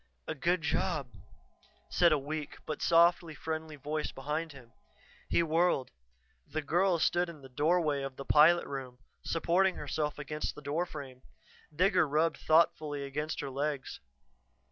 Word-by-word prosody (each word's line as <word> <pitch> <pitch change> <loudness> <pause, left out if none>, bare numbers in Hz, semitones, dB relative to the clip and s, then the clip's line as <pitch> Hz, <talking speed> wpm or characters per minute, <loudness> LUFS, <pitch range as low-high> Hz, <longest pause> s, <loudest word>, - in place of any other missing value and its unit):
"A - - -2
good 170 +4 0
job," 150 -4 -1 0.8
said 170 -1 +4
a 155 - +4
weak, 150 +1 -5
but 155 - -4
softly 170 -1 +4
friendly 160 +1 -5
voice 150 +2 -3
behind 150 +4 -3
him. 125 -4 -15 0.6
He 170 - +3
whirled. 165 -4 +1 0.6
The 155 0 -3
girl 175 +4 +2
stood 175 +2 +1
in 155 -4 -11
the 135 - -11
doorway 150 +1 +1
of 135 -1 -5
the 135 - -8
pilot 165 +3 +5
room, 130 -3 -6 0.3
supporting 180 +3 +2
herself 150 -1 -3
against 150 +1 -4
the - - -10
door 155 +5 -1
frame. 135 -5 -9 0.5
Digger 180 +2 +3
rubbed 155 +3 +1
thoughtfully 155 -3 +2
against 150 +3 -3
her 140 -2 -5
legs. 140 0 -3
155 Hz, 145 wpm, -31 LUFS, 140-170 Hz, 0.8 s, pilot